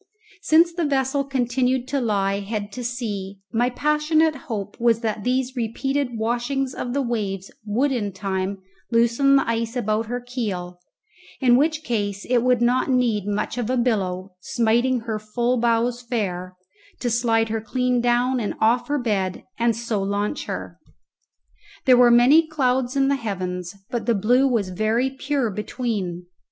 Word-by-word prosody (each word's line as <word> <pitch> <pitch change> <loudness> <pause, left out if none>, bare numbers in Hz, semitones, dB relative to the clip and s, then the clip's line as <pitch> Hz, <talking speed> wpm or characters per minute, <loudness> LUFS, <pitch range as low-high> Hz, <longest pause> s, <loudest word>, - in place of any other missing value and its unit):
Since 335 0 +4
the 345 0 -1
vessel 275 0 +1
continued 255 -1 0
to 280 -2 0
lie 200 -3 0
head 205 0 -4
to 250 +4 -6
sea, 210 -5 -4 0.2
my 240 +2 +2
passionate 300 +4 +2 0.2
hope 205 -3 -4
was 230 -1 +3
that 215 -3 -2
these 255 +1 0
repeated 250 +2 -2
washings 245 +4 -1
of 245 - -4
the 280 0 0
waves 200 -6 -3 0.2
would 250 +7 +1
in 215 -6 -1
time 190 0 -3 0.3
loosen 235 +4 +3
the 275 - +3
ice 230 +1 -1
about 220 -2 0
her 245 +2 -2
keel, 205 -8 -4 0.6
in 245 -3 +5
which 310 +3 +1
case 205 -6 -2
it 245 -1 +3
would 250 -1 +2
not 250 +3 +2
need 235 -6 +1
much 210 +4 -2
of 235 -1 -2
a 255 - +1
billow, 195 -6 -1
smiting 240 +4 +1
her 220 -2 -3
full 240 +4 -1
bows 235 +1 +1
fair, 185 -7 -3 0.4
to 245 - -1
slide 225 -1 +2
her 220 0 -2
clean 250 +2 0
down 245 +2 +2
and 215 - -2
off 230 +3 +2
her 295 0 0
bed 200 -7 -1 0.2
and 235 -1 +2
so 230 -2 -2
launch 200 +5 -2
her. - - -6 1.1
There 255 -2 +7
were 245 -1 +7
many 260 +7 +6
clouds 260 -4 0
in 270 -1 +3
the 280 0 +2
heavens, 185 -5 -4 0.2
but 240 0 -3
the 235 - +3
blue 245 +7 +3
was 225 -7 0
very 220 +7 0
pure 270 -3 -1
between. 205 -4 -3
235 Hz, 165 wpm, -23 LUFS, 210-255 Hz, 1.1 s, There